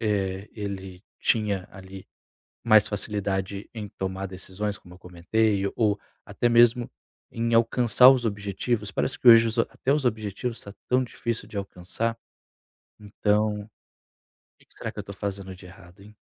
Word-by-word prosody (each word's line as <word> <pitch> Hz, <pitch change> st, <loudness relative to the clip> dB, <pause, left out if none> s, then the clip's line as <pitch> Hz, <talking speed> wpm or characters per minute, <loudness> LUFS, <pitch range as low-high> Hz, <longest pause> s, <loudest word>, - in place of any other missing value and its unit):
"eh, 100 Hz, -3 st, -1 dB
ele 95 Hz, -3 st, -7 dB, 0.2 s
tinha, 105 Hz, -4 st, 0 dB
ali, 95 Hz, 0 st, -11 dB, 0.6 s
mais 110 Hz, -3 st, +6 dB
facilidade 100 Hz, -1 st, -2 dB
em 105 Hz, -3 st, -6 dB
tomar 95 Hz, 0 st, -4 dB
decisões", 95 Hz, +2 st, -5 dB
como 90 Hz, -, -15 dB
eu 90 Hz, -, -16 dB
comentei, 100 Hz, +3 st, 0 dB
ou 105 Hz, -3 st, +2 dB, 0.3 s
até 120 Hz, -, -2 dB
mesmo 120 Hz, 0 st, +4 dB, 0.4 s
em 115 Hz, 0 st, -1 dB
alcançar 120 Hz, +2 st, +6 dB
os 130 Hz, -2 st, +2 dB
objetivos, 105 Hz, +1 st, -2 dB
parece 130 Hz, -, -2 dB
que 125 Hz, -, +4 dB
hoje 115 Hz, 0 st, +9 dB
os 115 Hz, -, -5 dB
a 115 Hz, -, +6 dB
até 135 Hz, -, -1 dB
os 145 Hz, -2 st, 0 dB
objetivos, 110 Hz, +1 st, -2 dB
está 100 Hz, -, -9 dB
tão 125 Hz, +1 st, +3 dB
difícil 115 Hz, -1 st, -4 dB
de 105 Hz, -, -10 dB
alcançar. 100 Hz, +4 st, -3 dB, 0.8 s
Então, 105 Hz, 0 st, -1 dB, 0.9 s
que -, -, -24 dB
que -, -, -19 dB
será -, -, -5 dB
que -, -, -9 dB
eu -, -, -1 dB
estou -, -, -10 dB
fazendo 100 Hz, -2 st, -5 dB
de 90 Hz, 0 st, -15 dB
errado, 90 Hz, 0 st, -15 dB
hein? 105 Hz, +2 st, -15 dB
105 Hz, 160 wpm, -26 LUFS, 95-115 Hz, 0.9 s, hoje